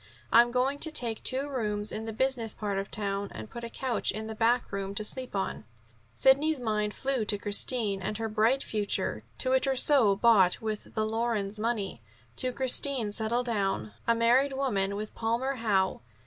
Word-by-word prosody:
I'm 235 +1 +7
going 255 +3 0
to 320 - +1
take 235 -7 -2
two 265 +2 +1
rooms 210 -6 -2
in 220 +1 -5
the 225 - -4
business 235 -1 0
part 200 -2 -2
of 195 - -5
town, 200 -1 -3
and 110 0 -9
put 235 - -8
a 235 - -5
couch 255 0 -2
in 220 0 -5
the 220 - -5
backroom 215 -4 0
to 215 - -1
sleep 255 +2 -4
on." 195 - -3 0.5
Sidney's 275 - +3
mind 210 -3 -1
flew 270 -4 -1
to 205 - 0
Christine 205 0 +1
and 200 +3 -3
her 225 0 -2
bright 220 +5 +2
future, 210 -2 -2
to 255 - -2
a 260 - +5
trousseau 265 -5 +4
bought 200 -4 +4
with 215 -1 -5
the 215 - +1
Lorenz 215 -2 -1
money, 210 - -2 0.4
to 255 - +4
Christine 260 -3 +2
settled 230 +3 +1
down, 195 - -1
a 230 - +4
married 245 +4 +3
woman, 200 -8 -1
with 210 +1 -6
Palmer 240 +4 -1
Howe. 195 -5 0
225 Hz, 180 wpm, -28 LUFS, 205-255 Hz, 0.5 s, I'm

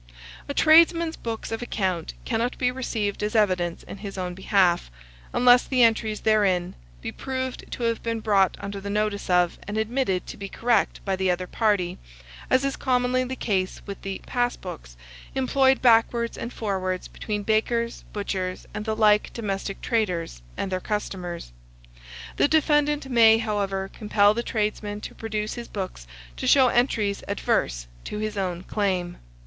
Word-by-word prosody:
A - - -1
tradesman's 330 +1 +5
books 225 -1 -5
of 225 - -3
account 185 -8 -2
cannot 240 +1 -1
be 250 -1 +1
received 225 -5 -2
as 210 +2 -2
evidence 180 -5 +1
in - - -9
his 200 -1 -7
own 180 -1 -3
behalf, 185 - +2 0.4
unless 245 0 +5
the 255 -2 +3
entries 220 -2 +2
therein 200 -5 +2 0.3
be - - -3
proved 260 -1 -4
to 245 - -5
have 230 -1 0
been 230 -1 -2
brought 200 -4 +2
under 200 0 -6
the 200 - -5
notice 210 -1 -1
of, 180 -1 +2
and 205 +1 -3
admitted 220 -4 0
to - - -8
be 195 -1 -6
correct 230 -1 0
by 195 -1 +1
the 190 0 0
other 180 +1 0
party, 200 -3 0 0.5
as 260 +1 +3
is 275 - -1
commonly 255 -1 +1
the 255 +1 -4
case 190 -6 -1
with 200 -1 -7
the 195 -1 -4
"pass 245 0 0
books" - - -9 0.4
employed 265 0 +3
backwards 235 0 +4
and 235 - -5
forwards 185 -5 -2
between 210 -1 -4
bakers, 230 +2 0
butchers, 190 -3 -3
and 210 - -4
the 220 -1 -1
like 210 -1 +4
domestic 195 -3 -4
traders, 180 - -1 0.2
and 195 - -3
their 185 - 0
customers. 180 - -4 0.9
The - - +4
defendant 295 -2 +2
may, 230 -3 +6
however, 200 -3 -1
compel 210 -1 +3
the 235 - -1
tradesman 210 -2 -2
to - - -7
produce 215 -1 -3
his 240 -1 -7
books 185 - -6 0.3
to - - -3
show 265 -3 +6
entries 220 -5 +1
adverse - - 0 0.2
to - - -5
his 215 0 -3
own 180 -3 -2
claim. 185 -4 -1
210 Hz, 165 wpm, -25 LUFS, 190-235 Hz, 0.9 s, may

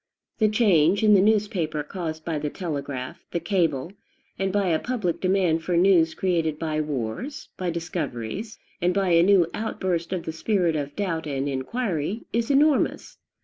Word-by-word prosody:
The 215 - +4
change 200 -3 +3
in 210 -1 +6
the 195 - +6
newspaper 200 -8 +1
caused 160 -1 -5
by 160 -3 -1
the 150 0 -2
telegraph, 140 -7 -5
the 170 - -2
cable, 170 -3 0 0.5
and 195 0 0
by 200 -1 +1
a 160 -2 +2
public 215 -9 -2
demand 185 -4 +2
for 175 +1 0
news 170 -3 +4
created 165 -5 0
by 155 -1 -1
wars, 150 - -4
by 180 -1 -2
discoveries, 170 - -4 0.2
and 180 +1 +1
by 195 -2 +1
a 170 -1 +5
new 190 -1 +5
outburst 185 -6 -2
of 185 -3 -2
the - - -3
spirit 175 -1 +1
of 145 -1 -3
doubt 165 -6 -2
and 140 -1 -2
inquiry, 175 - -2
is 230 0 0
enormous. 285 +1 +2
175 Hz, 165 wpm, -25 LUFS, 155-200 Hz, 0.5 s, in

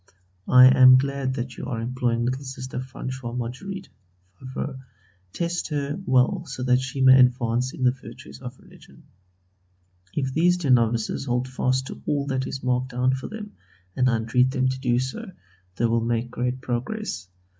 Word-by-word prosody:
I 125 0 +8
am 130 0 +8
glad 135 -1 -1
that 125 -1 -5
you - - -6
are 120 -4 -3
employing 120 0 -1
little 130 +3 -2
Sister 130 -1 -6
Françoise 130 -1 -6
Marguerite 180 +12 -6 0.5
(Favrot). 130 +2 -6 0.5
Test 170 - -2
her 145 +2 -3
well 130 +8 +3
so 130 -2 -5
that 125 0 +3
she 135 +1 -4
may 130 0 +7
advance 125 0 +2
in 130 - -5
the 125 - +5
virtues 130 - -12
of - - -8
religion. - - -18 1.1
If 135 -2 -1
these 175 +4 +3
dear 150 -7 0
novices 115 0 +1
hold 125 0 -1
fast 130 0 0
to - - -9
all 145 -1 0
that 130 -2 -2
is 135 - -6
marked 125 0 0
down 125 +1 +1
for 130 +1 -4
them, 215 -1 -8 0.4
and 130 0 +3
I 120 - +2
entreat 120 +3 +2
them 130 0 +1
to 130 0 -3
do 120 -2 +1
so, 130 +8 -4 0.4
they 120 - 0
will 115 0 +2
make 120 +1 -1
great 125 +1 -2
progress. 125 - -4
130 Hz, 175 wpm, -24 LUFS, 125-135 Hz, 1.1 s, I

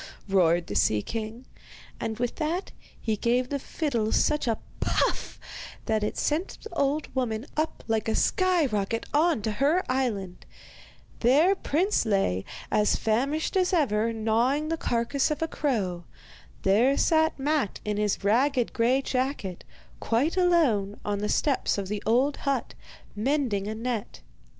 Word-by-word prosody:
roared 175 -3 +3
the - - -6
sea 105 0 +2
king; 225 +2 -5 0.5
and 220 -1 -3
with 245 0 -2
that 330 +4 -2 0.3
he 220 - -1
gave 245 +4 +1
the 280 - -2
fiddle 240 -7 -2
such 300 -3 +2
a 225 - +1 0.2
'puff' - - 0 0.5
that 220 -1 +1
it 210 - -2
sent 315 +5 -1
the 445 - -9
old 290 -1 0
woman 240 -3 -1
up 310 +1 -2
like 225 -1 0
a 220 - +1
sky 365 -4 +2
rocket 215 -1 -1
on 305 -6 +2
to 220 - 0
her 290 - +2
island. 215 -9 -2 0.8
There 290 +10 +5
Prince 380 +2 +1
lay, 195 - 0 0.3
as 210 0 +3
famished 275 - 0
as 370 -1 +2
ever, 230 - +2
gnawing 230 +7 +1
the 330 - +1
carcase 245 +2 0
of 300 +1 -1
a - - 0
crow. 195 - -2 0.6
There 235 +8 +4
sat 315 -1 +3
Matte 285 -5 0
in 210 -1 -1
his 210 -1 0
ragged 245 +4 +2
grey 250 +4 +2
jacket, 255 -9 -2 0.4
quite 260 +10 +1
alone, 295 - +2
on 205 -1 -1
the 210 +1 -2
steps 280 -7 +1
of 195 -2 -3
the 210 0 -3
old 260 +6 +2
hut, 275 -4 -2 0.4
mending 225 -4 0
a 215 - -3
net. 230 -1 -4
245 Hz, 150 wpm, -27 LUFS, 210-295 Hz, 0.8 s, There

